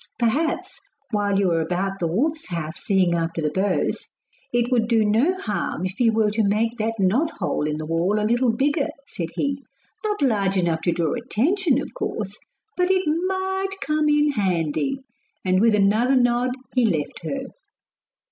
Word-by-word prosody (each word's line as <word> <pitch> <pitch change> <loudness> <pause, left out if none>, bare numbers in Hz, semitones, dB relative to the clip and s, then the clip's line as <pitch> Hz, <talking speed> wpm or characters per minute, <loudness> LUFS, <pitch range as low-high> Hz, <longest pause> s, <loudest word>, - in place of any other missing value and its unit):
'Perhaps, 320 - 0 0.3
while 205 -2 +1
you 195 -3 +2
are 165 -1 +2
about 190 +4 -2
the 170 - 0
wolf's 300 - -1
house 165 -2 -4
seeing 190 -3 +2
after 165 0 -1
the 155 -2 0
bows, 190 0 0 0.4
it 240 +1 +1
would 235 -3 +2
do 225 -2 +3
no 235 - +3
harm 210 - -2
if 185 +5 -5
you 235 -2 +4
were 220 -1 +2
to 215 +2 0
make 220 +3 +1
that 225 0 -1
knot 220 - +2
hole 150 - -1
in 150 0 -2
the 155 - -5
wall 170 +6 +1
a 210 - 0
little 240 +2 +2
bigger,' 280 +5 +1 0.2
said 170 - -5
he. 280 -1 -1 0.4
'Not 420 -6 -1
large 200 -6 +2
enough 170 -3 +1
to 175 - +3
draw 170 -2 0
attention, 270 - +1
of - - -6
course; - - -4 0.4
but 360 0 +1
it 380 0 +3 0.2
might 380 +1 -2
come 305 0 +1
in 295 0 +3
handy.' 195 - -1 0.4
And 185 +1 +3
with 225 -1 +4
another 215 +6 +3
nod 245 0 +2 0.2
he 255 - +3
left 165 -10 0
her. 270 +11 -3
225 Hz, 175 wpm, -23 LUFS, 185-275 Hz, 0.4 s, you